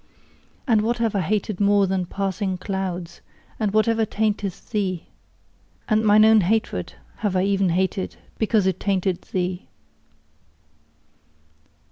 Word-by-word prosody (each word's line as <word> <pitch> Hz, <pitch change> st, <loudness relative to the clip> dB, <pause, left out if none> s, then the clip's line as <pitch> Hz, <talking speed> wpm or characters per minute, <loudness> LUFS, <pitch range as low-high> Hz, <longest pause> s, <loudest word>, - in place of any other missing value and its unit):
And 220 Hz, -4 st, +4 dB
what 235 Hz, +3 st, 0 dB
have 230 Hz, -2 st, 0 dB
I -, -, +2 dB
hated 205 Hz, +2 st, -1 dB
more 200 Hz, -1 st, +4 dB
than 185 Hz, -1 st, -1 dB
passing 195 Hz, 0 st, -2 dB
clouds, 185 Hz, -3 st, -4 dB, 0.4 s
and 215 Hz, -3 st, 0 dB
whatever 225 Hz, +1 st, +2 dB
tainteth 210 Hz, -3 st, -2 dB
thee? 190 Hz, -5 st, -2 dB, 0.8 s
And 215 Hz, -1 st, +2 dB
mine 215 Hz, 0 st, +6 dB
own 220 Hz, -1 st, +6 dB
hatred 215 Hz, +5 st, -1 dB, 0.2 s
have 205 Hz, -3 st, -1 dB
I 185 Hz, -, +2 dB
even 195 Hz, -1 st, +2 dB
hated, 185 Hz, +2 st, -1 dB, 0.2 s
because 215 Hz, -2 st, +2 dB
it 190 Hz, -1 st, 0 dB
tainted 190 Hz, -2 st, 0 dB
thee! 180 Hz, 0 st, -2 dB
200 Hz, 125 wpm, -23 LUFS, 185-215 Hz, 0.8 s, mine